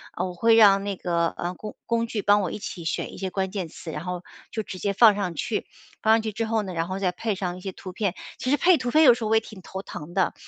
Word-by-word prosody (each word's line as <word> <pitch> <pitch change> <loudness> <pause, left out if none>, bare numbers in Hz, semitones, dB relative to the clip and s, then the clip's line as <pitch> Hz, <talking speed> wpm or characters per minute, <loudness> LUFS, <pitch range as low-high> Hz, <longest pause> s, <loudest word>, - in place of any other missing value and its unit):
呃， - - -1
我 180 - -5
会 225 +5 +4
让 200 -3 +6
那 200 -1 -2
个， 170 -2 0
呃， 175 +1 -4
工 210 +2 -8
工 230 0 0
具 220 -2 -3
帮 205 +1 +4
我 185 -4 -2
一 - - -4
起 205 -5 -7
选 - - -2
一 - - -10
些 190 - -3
关 190 0 -2
键 190 -4 -3
词， 160 0 -9
然 155 +2 -6
后 180 -1 -4 0.3
就 220 - -3
直 185 - -8
接 200 +2 0
放 215 +1 +7
上 190 -4 -2
去。 210 +7 -2 0.4
放 220 - +5
上 225 - +4
去 220 0 -3
之 225 +2 -2
后 220 0 0
呢， 190 -2 -6
然 165 0 -1
后 190 +1 -4
再 185 -2 +1
配 215 +3 -2
上 180 -2 -3
一 - - -9
些 190 +1 -6
图 185 - -9
片。 190 0 -2 0.2
其 255 - -3
实 285 - +5
配 355 +3 +5
图 250 -3 -3
片 310 +4 +6
有 255 -5 +9
时 235 -1 -4
候 - - -1
我 220 - +4
也 220 - +4
挺 210 -3 -12
头 190 +2 -7
疼 165 -3 -9
的， 185 -1 +1
200 Hz, 325 characters per minute, -25 LUFS, 180-220 Hz, 0.4 s, 有